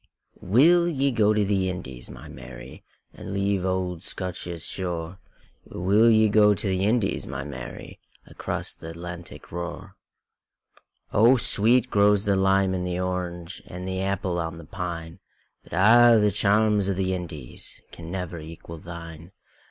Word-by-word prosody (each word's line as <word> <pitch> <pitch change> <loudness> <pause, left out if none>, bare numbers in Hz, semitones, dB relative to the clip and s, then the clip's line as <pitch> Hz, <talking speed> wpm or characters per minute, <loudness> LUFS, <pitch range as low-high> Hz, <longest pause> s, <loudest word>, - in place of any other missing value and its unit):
WILL 165 - +4
ye 140 -3 0
go 110 -3 +3
to 105 -1 +2
the 95 -2 0
Indies, 65 -9 -7
my - - -11
Mary, 65 0 -11 0.3
And 95 - -7
leave 100 -1 0
auld 95 -2 -2
Scotia's 90 -3 -4
shore? 90 -1 -3 0.4
Will 100 +6 +2
ye 110 -1 +5
go 105 0 +5
to 105 +2 -3
the 95 0 0
Indies, 110 -2 0
my 65 +1 -5
Mary, 65 -4 -9 0.3
Across - - -3
th' - - -13
Atlantic 85 +1 -9
roar?O 100 +6 -3
sweet 115 +2 +4
grows 100 0 +3
the 100 -1 +2
lime 95 0 +2
and 90 -1 -2
the 90 0 -2
orange, 90 -1 -4
And 90 +1 -7
the 95 0 -3
apple 95 -2 -2
on 80 0 -4
the 85 - -11
pine; 85 -1 -6 0.4
But - - -15
a' 115 +6 +6
the 105 -1 +3
charms 105 0 +3
o' - - +1
the 95 0 -1
IndiesCan 85 -1 -5
never 90 -1 -5
equal 80 +1 -10
thine. 85 0 -10
95 Hz, 145 wpm, -25 LUFS, 85-105 Hz, 0.4 s, a